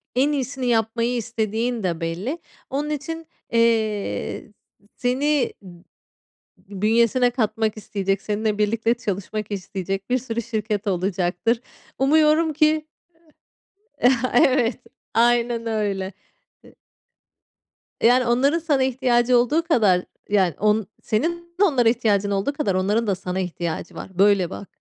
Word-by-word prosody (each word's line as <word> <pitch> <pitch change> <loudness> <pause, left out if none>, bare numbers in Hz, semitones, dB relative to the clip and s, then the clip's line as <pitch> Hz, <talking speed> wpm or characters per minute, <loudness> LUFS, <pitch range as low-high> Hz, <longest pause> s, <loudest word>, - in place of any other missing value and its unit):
en 275 +4 +3
iyisini 265 -2 -3
yapmayı 230 +1 +1
istediğin 225 0 -2
de 170 -2 -2
belli. 190 - -3 0.3
Onun 290 +3 -2
için, 325 +2 -5 0.2
eee, 225 -3 0 0.4
s 205 - -27
seni 270 +3 +1
b 175 -2 -14 1.0
bünyesine 235 +3 +3
katmak 220 -2 -1
isteyecek, 195 -2 -2
seninle 210 0 -1
birlikte 225 +2 +1
çalışmak 210 -1 -4
isteyecek 195 +1 -4
bir 255 - +3
sürü 235 -2 -3
şirket 215 -2 -3
olacaktır. 185 +4 0 0.4
Umuyorum 310 +3 +3
ki 310 0 +2 1.2
eee, 250 - +7 0.2
evet 245 -1 +3 0.4
aynen 235 0 +2
öyle. 200 -3 -2 0.5
E - - -18 1.3
Yani, 245 +2 +5
onların 275 +7 +2
sana 290 -5 +1
ihtiyacı 250 -1 +2
olduğu 295 +8 +2
kadar, 210 - +3 0.3
yani, 190 -6 +2
on 210 -1 +2 0.2
senin 340 +9 -2
de - - +8
onlara 255 - +4
ihtiyacın 210 -4 +1
olduğu 200 +9 0
kadar 205 -10 -1
onların 210 +4 +1
da 195 - +1
sana 180 0 -4
ihtiyacı 170 -2 -4
var. - - -7
Böyle 200 -3 +4
bak, 200 - -8
230 Hz, 125 wpm, -23 LUFS, 200-255 Hz, 1.3 s, de